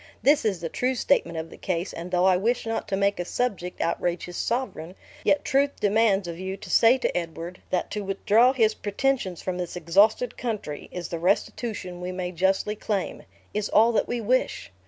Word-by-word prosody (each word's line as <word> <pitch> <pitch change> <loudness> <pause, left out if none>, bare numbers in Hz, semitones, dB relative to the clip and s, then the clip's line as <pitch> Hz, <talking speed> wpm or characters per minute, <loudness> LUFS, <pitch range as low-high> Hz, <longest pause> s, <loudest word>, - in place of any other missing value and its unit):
This 285 -2 +4
is 195 -6 0
the 165 - -2
true 255 +9 -1
statement 170 -11 +1
of 160 0 -5
the - - -11
case, 180 0 -2
and 170 +2 -6
though 180 0 +2
I 190 -1 +5
wish 230 +7 0
not 225 0 -2
to 195 - -1
make 200 -1 +1
a - - 0
subject 180 -3 -2
outrage 170 +1 -1
his 175 - -9
sovereign, 210 -9 -3 0.3
yet 295 - +2
truth 280 +1 +1
demands 205 -2 +2
of 170 0 -6
you 190 +1 -4
to - - -9
say 235 +3 +6
to 255 - -1
Edward, 170 +1 -5
that 180 - -1
to 210 -1 -3
withdraw 210 +5 +3
his 225 -5 +3
pretensions 205 -4 -1
from 180 -1 -3
this 180 -1 -4
exhausted 200 +8 +3
country, 215 -11 -4
is 175 -1 -5
the 170 - -4
restitution 185 0 -1
we 180 +1 -3
may 180 -1 -3
justly 190 +4 +1
claim 205 -2 -3 0.3
is 210 0 -1
all 225 +2 +5
that 225 - +1
we 240 - -2
wish. 230 - 0
195 Hz, 200 wpm, -25 LUFS, 180-225 Hz, 0.3 s, say